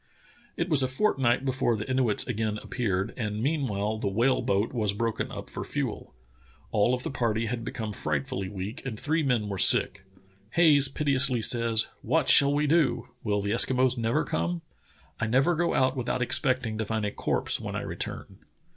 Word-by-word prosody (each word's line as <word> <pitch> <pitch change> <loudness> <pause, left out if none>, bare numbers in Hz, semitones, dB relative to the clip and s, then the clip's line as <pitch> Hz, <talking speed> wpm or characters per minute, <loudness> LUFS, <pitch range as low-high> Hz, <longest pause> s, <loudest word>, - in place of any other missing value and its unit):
It 170 - -1
was 155 -6 +3
a 130 - +1
fortnight 130 - +1
before 130 -3 0
the 105 - -5
Inuits 130 -5 0
again 110 0 -2
appeared, 100 -4 -2
and 105 -3 -3
meanwhile 110 -6 -1
the 105 - -2
whale 120 +7 +1
boat 100 +5 0
was 105 -5 0
broken 115 +2 -2
up - - -7
for - - -6
fuel. - - -5 0.6
All 110 +3 +2
of 125 - -7
the - - -4
party 115 -3 -1
had 115 +1 -4
become 110 -2 -5
frightfully 75 +3 -3
weak 105 +7 -6
and 115 -5 -6
three 160 +2 0
men 125 -7 +1
v/ere 100 -2 -4
sick. 95 +2 +3 0.5
Haj^es 145 -5 +5
piteously 135 -5 +2
says: 115 -1 +4
"What - - +1
shall 140 0 +7
we 145 +1 +1
do? 135 -6 +1
Will 105 -2 -1
the 100 - -2
Eskimos 125 +2 +2
never 115 -1 0
come? 85 +1 -2 0.6
I 110 - -1
never 135 +9 +2
go 170 +1 0
out 130 +1 +2
without 125 0 -1
expecting 130 -3 0
to 110 - -1
find 110 0 -2
a 100 - -2
corpse - - -1
when - - -5
I - - -2
return." - - -7
120 Hz, 180 wpm, -27 LUFS, 105-130 Hz, 0.6 s, shall